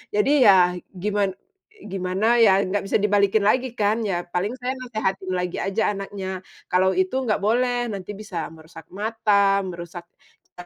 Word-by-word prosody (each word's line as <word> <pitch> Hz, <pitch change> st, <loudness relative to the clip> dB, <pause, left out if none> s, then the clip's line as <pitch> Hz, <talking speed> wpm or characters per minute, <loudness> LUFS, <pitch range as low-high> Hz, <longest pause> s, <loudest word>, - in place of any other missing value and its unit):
Jadi 210 Hz, +7 st, +2 dB
ya 185 Hz, -3 st, +6 dB, 0.2 s
giman 200 Hz, +1 st, -1 dB, 0.4 s
i 435 Hz, -, -19 dB
gimana 195 Hz, +5 st, +1 dB
ya, 200 Hz, -4 st, +5 dB
gak 195 Hz, +1 st, -2 dB
bisa -, -, -1 dB
dibalikin 205 Hz, 0 st, +2 dB
lagi 250 Hz, +3 st, +1 dB
kan, 215 Hz, +1 st, +1 dB
ya 175 Hz, -3 st, -1 dB
paling 180 Hz, +6 st, -3 dB
saya 255 Hz, +1 st, -1 dB
nasehatin 195 Hz, -6 st, -3 dB
lagi 180 Hz, -1 st, -3 dB
aja 200 Hz, +2 st, 0 dB
anaknya, 195 Hz, -1 st, -5 dB, 0.3 s
"Kalau 185 Hz, +1 st, +3 dB
itu 190 Hz, +9 st, 0 dB
gak 210 Hz, -, 0 dB
boleh, 245 Hz, +2 st, +1 dB
nanti 195 Hz, 0 st, -6 dB
bisa 185 Hz, -7 st, -5 dB
merusak 160 Hz, 0 st, -14 dB
mata, 200 Hz, -1 st, +2 dB
merusak 175 Hz, -1 st, -8 dB, 0.5 s
cara 180 Hz, -, -10 dB
200 Hz, 160 wpm, -23 LUFS, 185-215 Hz, 0.5 s, ya